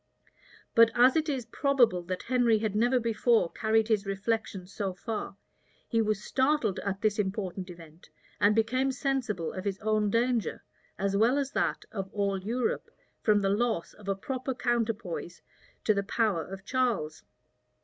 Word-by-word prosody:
But 230 Hz, 0 st, +7 dB
as 250 Hz, +2 st, +6 dB
it 315 Hz, 0 st, +1 dB
is 260 Hz, -5 st, -2 dB
probable 245 Hz, -11 st, +2 dB
that 185 Hz, +1 st, -4 dB
Henry 240 Hz, -3 st, +3 dB
had 215 Hz, -1 st, -2 dB
never 240 Hz, +4 st, +3 dB
before 230 Hz, -4 st, +2 dB
carried 220 Hz, 0 st, +1 dB
his 210 Hz, -3 st, +1 dB
reflections 195 Hz, -2 st, -2 dB
so 195 Hz, -3 st, -3 dB
far, 215 Hz, -1 st, -5 dB, 0.5 s
he 230 Hz, -2 st, +2 dB
was 215 Hz, -1 st, -1 dB
startled 260 Hz, -7 st, +1 dB
at 200 Hz, 0 st, -3 dB
this 215 Hz, -1 st, +1 dB
important 190 Hz, -2 st, -2 dB
event, 165 Hz, -1 st, -13 dB, 0.3 s
and 205 Hz, +1 st, +4 dB
became 255 Hz, +4 st, +2 dB
sensible 250 Hz, -, -2 dB
of 185 Hz, -, -5 dB
his 200 Hz, -1 st, -2 dB
own 215 Hz, -1 st, +1 dB
danger, 235 Hz, +1 st, 0 dB, 0.3 s
as 195 Hz, 0 st, 0 dB
well 230 Hz, +7 st, +4 dB
as 280 Hz, -1 st, -1 dB
that -, -, -1 dB
of 195 Hz, -4 st, -4 dB
all 200 Hz, -2 st, 0 dB
Europe, 235 Hz, +5 st, -2 dB, 0.3 s
from 210 Hz, -2 st, +3 dB
the 195 Hz, -, +1 dB
loss 215 Hz, -3 st, 0 dB
of 210 Hz, -2 st, -15 dB
a 195 Hz, -, +1 dB
proper 260 Hz, +5 st, -4 dB
counterpoise 225 Hz, -9 st, -2 dB, 0.4 s
to 215 Hz, -, +4 dB
the 200 Hz, -, 0 dB
power 200 Hz, -4 st, 0 dB
of 190 Hz, +1 st, -9 dB
Charles. 230 Hz, -, 0 dB
215 Hz, 160 wpm, -29 LUFS, 195-240 Hz, 0.5 s, But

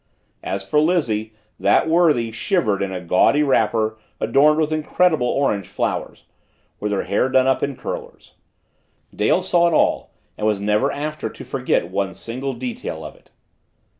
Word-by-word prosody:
As 95 Hz, 0 st, -4 dB
for 150 Hz, -, +2 dB
Lizzie, 130 Hz, -10 st, 0 dB, 0.3 s
that -, -, +3 dB
worthy 160 Hz, -9 st, +3 dB
shivered 115 Hz, -, 0 dB
in 100 Hz, -1 st, -2 dB
a 95 Hz, -, -4 dB
gaudy 90 Hz, -, +3 dB
wrapper 110 Hz, -5 st, +1 dB, 0.2 s
adorned 140 Hz, +7 st, +4 dB
with 155 Hz, -1 st, 0 dB
incredible 155 Hz, -2 st, +1 dB
orange 105 Hz, -9 st, 0 dB
flowers, -, -, -3 dB, 0.6 s
with 105 Hz, 0 st, -2 dB
her 100 Hz, -, 0 dB
hair 115 Hz, +6 st, 0 dB
done 130 Hz, 0 st, +3 dB
up 135 Hz, 0 st, +2 dB
in 140 Hz, -, -2 dB
curlers. -, -, -8 dB, 0.8 s
Dale -, -, +2 dB
saw 175 Hz, 0 st, +3 dB
it 170 Hz, -, +1 dB
all -, -, +1 dB, 0.3 s
and 105 Hz, -, 0 dB
was 105 Hz, -2 st, +1 dB
never 105 Hz, +7 st, +1 dB
after 150 Hz, +2 st, -4 dB
to -, -, -11 dB
forget -, -, -1 dB
one 95 Hz, -2 st, -2 dB
single 130 Hz, +4 st, -5 dB
detail 120 Hz, -10 st, -6 dB
of -, -, -8 dB
it. -, -, -25 dB
130 Hz, 160 wpm, -21 LUFS, 105-155 Hz, 0.8 s, adorned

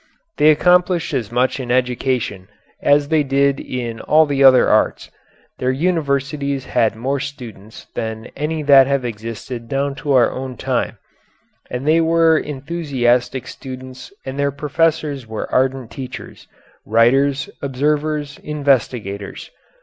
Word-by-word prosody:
They 150 Hz, -, +5 dB
accomplished 180 Hz, +1 st, +3 dB
as 115 Hz, -6 st, -2 dB
much 125 Hz, +3 st, +1 dB
in 125 Hz, -2 st, -5 dB
education 125 Hz, -5 st, -1 dB, 0.3 s
as 145 Hz, 0 st, +3 dB
they 160 Hz, -1 st, +3 dB
did 140 Hz, 0 st, +1 dB
in 120 Hz, -3 st, -5 dB
all 155 Hz, +1 st, +4 dB
the 140 Hz, -2 st, +1 dB
other 130 Hz, -1 st, +7 dB
arts, -, -, +1 dB, 0.5 s
their 130 Hz, -, 0 dB
universities 140 Hz, -2 st, -1 dB
had 110 Hz, -1 st, +1 dB
more 135 Hz, +5 st, -2 dB
students 120 Hz, -6 st, -9 dB
than 110 Hz, 0 st, -5 dB
any 155 Hz, +2 st, -2 dB
that 140 Hz, -2 st, +7 dB
have 140 Hz, -2 st, 0 dB
existed 115 Hz, +1 st, -6 dB
down 140 Hz, +1 st, -1 dB
to 145 Hz, -, 0 dB
our 125 Hz, -3 st, +4 dB
own 130 Hz, -1 st, -6 dB
time, -, -, -2 dB, 0.7 s
and 125 Hz, +4 st, -4 dB
they 160 Hz, +2 st, +4 dB
were 165 Hz, 0 st, +4 dB
enthusiastic 135 Hz, -5 st, -1 dB
students 130 Hz, -1 st, -9 dB
and 135 Hz, +1 st, -5 dB
their 140 Hz, 0 st, +2 dB
professors 150 Hz, -2 st, -1 dB
were 110 Hz, -1 st, -5 dB
ardent 130 Hz, -2 st, 0 dB
teachers, 130 Hz, -2 st, -9 dB, 0.4 s
writers, 135 Hz, +6 st, +2 dB
observers, 145 Hz, +2 st, -1 dB
investigators. 125 Hz, -9 st, -2 dB
135 Hz, 130 wpm, -19 LUFS, 125-145 Hz, 0.7 s, other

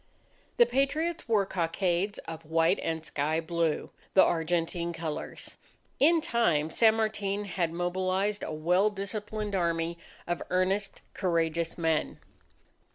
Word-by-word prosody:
The 480 Hz, -, +7 dB
Patriots 310 Hz, -, -1 dB
wore 210 Hz, -3 st, +3 dB
cockades 180 Hz, +2 st, 0 dB
of 165 Hz, 0 st, -7 dB
white 165 Hz, +1 st, +2 dB
and 160 Hz, -1 st, -3 dB
sky 155 Hz, +2 st, 0 dB
blue, 165 Hz, -1 st, -1 dB, 0.2 s
the 190 Hz, -, +8 dB
Argentine 170 Hz, +1 st, 0 dB
colours. 160 Hz, -2 st, -6 dB, 0.4 s
In 325 Hz, +4 st, +5 dB
time, 170 Hz, -, +1 dB
San 220 Hz, +3 st, +5 dB
Martin 210 Hz, -2 st, -1 dB
had 175 Hz, -4 st, -1 dB
mobilized 185 Hz, +4 st, -1 dB
a -, -, -4 dB
well 180 Hz, +6 st, +2 dB
disciplined 210 Hz, +1 st, -4 dB
army 170 Hz, -2 st, 0 dB, 0.3 s
of 175 Hz, 0 st, -2 dB
earnest 190 Hz, +2 st, 0 dB
courageous 165 Hz, -2 st, 0 dB
men. 160 Hz, -2 st, 0 dB
175 Hz, 120 wpm, -29 LUFS, 165-205 Hz, 0.4 s, the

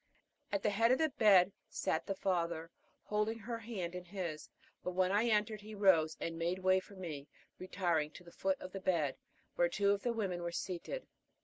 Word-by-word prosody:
At 200 Hz, -, 0 dB
the 210 Hz, -, +3 dB
head 225 Hz, +4 st, +4 dB
of 255 Hz, -, +5 dB
the 315 Hz, +1 st, +2 dB
bed 200 Hz, -7 st, +6 dB, 0.2 s
sat 160 Hz, -, -1 dB
the 195 Hz, -, -1 dB
father, 170 Hz, -3 st, -1 dB, 0.3 s
holding 210 Hz, +2 st, 0 dB
her 230 Hz, +1 st, -5 dB
hand 200 Hz, -7 st, -4 dB
in 180 Hz, 0 st, -6 dB
his; 175 Hz, -5 st, -5 dB, 0.3 s
but 180 Hz, -, -3 dB
when 185 Hz, 0 st, +2 dB
I 210 Hz, +4 st, +3 dB
entered 215 Hz, -1 st, +1 dB
he 215 Hz, +1 st, -9 dB
rose 175 Hz, -6 st, +4 dB
and 165 Hz, 0 st, -3 dB
made 170 Hz, +2 st, 0 dB
way 185 Hz, 0 st, +4 dB
for 195 Hz, +2 st, -14 dB
me, 155 Hz, -7 st, -6 dB, 0.3 s
retiring 175 Hz, -5 st, 0 dB
to 180 Hz, -, -11 dB
the 170 Hz, -, -14 dB
foot 190 Hz, +1 st, 0 dB
of 185 Hz, -, -8 dB
the 195 Hz, -, -6 dB
bed, 165 Hz, -7 st, +1 dB, 0.4 s
where 175 Hz, 0 st, +4 dB
two 200 Hz, +3 st, +2 dB
of 200 Hz, 0 st, +1 dB
the 240 Hz, -, 0 dB
women 195 Hz, -6 st, -2 dB
were 170 Hz, 0 st, -2 dB
seated. 180 Hz, -, -4 dB
185 Hz, 205 wpm, -35 LUFS, 170-210 Hz, 0.4 s, bed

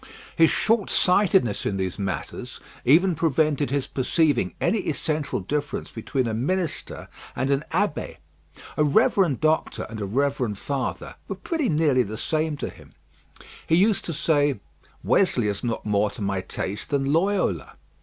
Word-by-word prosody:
His 165 Hz, -1 st, +5 dB
shortsightedness 190 Hz, -, +2 dB
in 100 Hz, -, -1 dB
these 95 Hz, +1 st, -3 dB
matters 95 Hz, -6 st, -4 dB, 0.3 s
even 175 Hz, +8 st, +5 dB
prevented 155 Hz, -2 st, +1 dB
his 140 Hz, 0 st, 0 dB
perceiving 135 Hz, -, +1 dB
any 225 Hz, -, +1 dB
essential 150 Hz, -, -2 dB
difference 145 Hz, +9 st, -3 dB
between 125 Hz, +3 st, -2 dB
a 115 Hz, -, -2 dB
minister 165 Hz, +9 st, -2 dB, 0.3 s
and 130 Hz, +3 st, 0 dB
an 140 Hz, +1 st, +1 dB
abbé. -, -, -1 dB, 0.6 s
A 150 Hz, -, +4 dB
reverend 180 Hz, -, +3 dB
doctor 155 Hz, 0 st, +1 dB
and 110 Hz, -2 st, -6 dB
a -, -, -1 dB
reverend 125 Hz, -1 st, 0 dB
father 140 Hz, +4 st, -4 dB
were -, -, -4 dB
pretty 315 Hz, -8 st, -2 dB
nearly 150 Hz, -4 st, +3 dB
the 110 Hz, -2 st, -4 dB
same 155 Hz, +3 st, -1 dB
to -, -, -4 dB
him. -, -, -17 dB, 0.7 s
He 160 Hz, -, +4 dB
used 200 Hz, +4 st, +3 dB
to 170 Hz, -, -3 dB
say, 145 Hz, -5 st, +1 dB, 0.4 s
"Wesley 125 Hz, -, +2 dB
is 100 Hz, -1 st, -2 dB
not 115 Hz, -2 st, -2 dB
more 105 Hz, 0 st, +2 dB
to 105 Hz, -, -10 dB
my 100 Hz, -1 st, -1 dB
taste 100 Hz, +2 st, -5 dB
than 140 Hz, -1 st, 0 dB
Loyola." 180 Hz, -, 0 dB
145 Hz, 150 wpm, -24 LUFS, 115-165 Hz, 0.7 s, His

